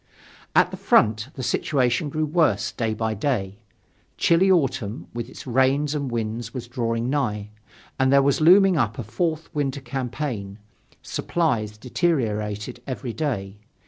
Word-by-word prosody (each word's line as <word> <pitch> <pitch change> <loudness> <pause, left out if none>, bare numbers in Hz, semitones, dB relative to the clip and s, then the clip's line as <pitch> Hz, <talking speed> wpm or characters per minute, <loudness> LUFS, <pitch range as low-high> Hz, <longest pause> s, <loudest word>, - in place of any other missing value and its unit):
At - - +5
the - - -6
front, 110 +2 +3
the 130 - -5
situation 130 +2 +1
grew 155 +2 -1
worse 150 - +1
day 110 -2 -2
by 110 0 -1
day. 100 -4 -2 0.6
Chilly 175 +3 +4
autumn, 130 - +1
with 120 0 -5
its - - -11
rains 135 +3 +2
and 140 -3 -2
winds, 115 0 -3
was 125 -2 -5
drawing 115 -1 -1
nigh. 105 -7 -1 0.5
And 130 0 +3
there 140 0 +6
was 140 +2 +2
looming 185 +2 +6
up 115 -6 0
a 120 - -3
fourth 160 - -2
winter 140 -2 -1
campaign. 125 -5 -4 0.5
Supplies 115 -11 -1
deteriorated 110 - -1
every 130 -2 -4
day. 105 -10 -3
125 Hz, 145 wpm, -24 LUFS, 110-145 Hz, 0.6 s, there